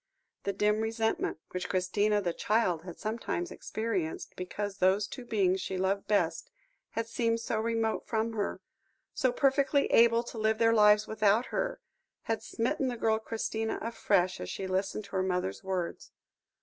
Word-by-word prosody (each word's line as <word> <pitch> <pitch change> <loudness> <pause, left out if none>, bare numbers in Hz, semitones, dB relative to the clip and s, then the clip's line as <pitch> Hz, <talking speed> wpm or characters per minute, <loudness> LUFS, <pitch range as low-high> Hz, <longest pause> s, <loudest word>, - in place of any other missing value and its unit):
The 200 - 0
dim 210 +2 +2
resentment 225 -4 -1
which 180 0 -4
Christina, 205 +3 +1
the 175 -2 0
child, 200 -7 +1
had 175 -1 -9
sometimes 215 -5 -3
experienced, 205 -8 -3
because 200 +2 -4
those 190 +3 +3
two 255 - -8
beings 190 -5 +1
she 190 - -3
loved 195 +2 0
best 175 -6 +1 0.4
had 230 - -1
seemed 230 0 0
so 225 -1 -2
remote 225 0 -1
from 225 0 0
her, 205 -2 -2 0.5
so 255 - +2
perfectly 280 +2 +3
able 230 0 +5
to 235 -1 -7
live 220 0 +2
their 230 0 +4
lives 210 -1 +6
without 215 +2 +2
her, - - -1 0.4
had 225 -1 -1
smitten 255 +5 -1
the 245 -1 -2
girl 220 -1 +2
Christina 220 0 -2
afresh 195 -5 +1
as 90 - -5
she 195 - -4
listened 190 +3 -1
to 200 - -16
her 190 - 0
mother's 180 - -1
words. 185 -3 -3
215 Hz, 160 wpm, -30 LUFS, 190-230 Hz, 0.5 s, lives